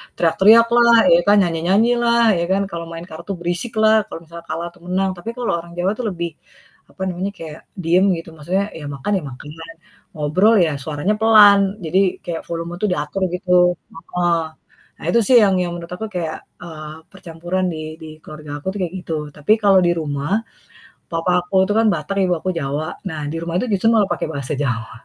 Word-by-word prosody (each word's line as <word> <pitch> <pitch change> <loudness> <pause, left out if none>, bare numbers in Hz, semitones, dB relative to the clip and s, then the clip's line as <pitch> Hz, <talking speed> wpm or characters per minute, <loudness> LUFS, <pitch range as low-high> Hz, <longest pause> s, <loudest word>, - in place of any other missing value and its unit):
teriak-teriak 205 +7 +5
lah, 235 -1 +6 0.2
ya 170 - +7
kan, 205 - +6
nyanyi-nyanyi 180 +7 +2
lah 235 0 +3 0.2
ya 170 - 0
kan, 195 +1 +2
kalau 170 0 -5
main 165 0 -7
kartu 170 +5 -8
berisik 175 +7 -3
lah 220 0 +6
kalau 165 - -9
misalnya 170 +1 -12
kalah 165 +2 -3
atau 175 - -23
menang. 190 +1 0
Tapi 175 +6 -7
kalau 245 -1 -1
orang 170 +1 -11
Jawa 185 +3 +1
itu 250 - -5
lebih, 170 -3 -4 0.6
apa - - -16
namanya, 185 +3 -3
kayak 160 -1 -9
diem 180 +1 +2
gitu 165 - -9
maksudnya, 180 +6 -1
ya 155 -3 -8
makan 140 +7 -4
ya - - -11
makan, 130 +3 -11 0.7
ngobrol 180 +9 +3
ya 160 -4 +1
suaranya 155 +8 -1
pelan, 205 -2 +6
jadi 185 +3 +1
kayak 165 -1 -4
volume 170 0 -5
tuh 210 - +2
diatur 150 +3 -3
gitu. 180 0 -4 0.4
Heeh. 170 0 -1 0.6
Nah - - -9
itu 235 - +5
sih 255 - +6
yang 195 -2 +3
yang 175 -1 -2
menurut 170 0 -10
aku 220 +5 -5
kayak, 165 -3 -3 0.2
eee, 155 -2 -8 0.2
percampuran 175 0 -4
di 155 0 -7
di 160 - -8 0.2
keluarga 150 -1 -10
aku 145 - -11
tuh 205 - -6
kayak 175 -1 -3
gitu. 165 - -3 0.2
Tapi 150 +8 +2
kalau 195 -2 +5
di 175 - +3
rumah, 150 +7 -1 0.7
papa 165 +1 -1
aku 180 - -11
itu - - +1
kan 225 - +3
Batak, 170 +4 -4
ibu 180 - +1
aku 185 - -4
Jawa, 145 +1 -3
nah 160 -4 -5
di 165 - -4
rumah 170 0 -4
itu 250 - -2
justru 200 +3 +2 0.2
pake 175 - -2
bahasa 140 -1 -4
Jawa. 120 -5 -2
175 Hz, 195 wpm, -19 LUFS, 160-195 Hz, 0.7 s, ya